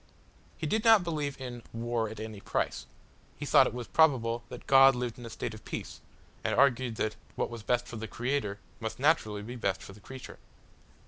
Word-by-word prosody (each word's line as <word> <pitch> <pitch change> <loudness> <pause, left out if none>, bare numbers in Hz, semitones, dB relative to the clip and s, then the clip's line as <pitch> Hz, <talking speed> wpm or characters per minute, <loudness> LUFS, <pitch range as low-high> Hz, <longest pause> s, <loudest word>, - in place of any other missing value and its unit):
He - - -3
did 215 +8 +1
not 225 -4 +7
believe 150 -5 -2
in 125 -2 -6
"war 115 -1 -1
at 110 - -8
any 110 -2 -6
price." - - -2 0.5
He - - -5
thought - - +6
it 125 -1 -6
probable 120 -7 +4
that - - -9
God 135 0 +7
lived 125 -1 -3
in 120 - -8
a - - -8
state 115 0 -4
of 110 - -11
peace, - - -6 0.4
and - - +1
argued 125 -3 +3
that 110 0 -1 0.2
what - - -1
was 115 -1 -6
best 120 +3 +1
for 120 - -7
the 110 +1 -5
Creator 120 -5 -2 0.2
must 110 -1 -4
naturally 125 -8 +2
be 120 +4 -7
best 100 -6 -1
for 95 - -10
the 105 - -15
creature. 130 +5 -10
120 Hz, 200 wpm, -30 LUFS, 110-135 Hz, 0.5 s, not